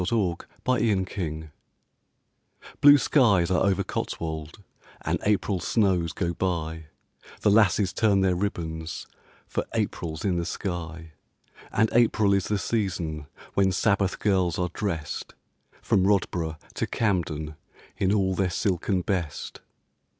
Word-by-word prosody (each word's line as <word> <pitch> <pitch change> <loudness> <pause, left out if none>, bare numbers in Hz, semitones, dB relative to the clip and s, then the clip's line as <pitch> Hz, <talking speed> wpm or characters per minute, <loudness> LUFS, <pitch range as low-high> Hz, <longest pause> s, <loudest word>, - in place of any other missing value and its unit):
COTSWOLD 90 -4 -1 0.2
LOVE 95 - 0 1.3
Blue 145 0 +9
skies 105 - +3
are 90 - +3
over 95 -2 +2
Cotswold 80 +4 -5 0.4
And - - -1
April 100 -2 +1
snows 90 -3 +1
go 85 -1 -2
by, 80 -3 -2 0.6
The 105 - +4
lasses 100 -2 +4
turn 105 -4 +3
their 95 -1 +3
ribbons 85 -4 -3 0.4
For - - -2
April's 80 0 -2
in 90 -3 +1
the 85 - -1
sky, 85 -3 -5 0.6
And 110 - +3
April 110 -4 +4
is 100 -2 +1
the 105 - +1
season 90 -8 -2 0.3
When 95 -1 +3
Sabbath 100 0 +1
girls 95 -5 +1
are 90 -1 -1
dressed, 85 -8 -4 0.5
From 95 0 +3
Rodboro' 90 -5 0 0.2
to - - -2
Campden, 80 -8 -1 0.4
In 95 0 +1
all 95 -2 +2
their 95 0 +1
silken 95 0 0
best. 85 -6 -3
95 Hz, 120 wpm, -26 LUFS, 85-100 Hz, 1.3 s, Blue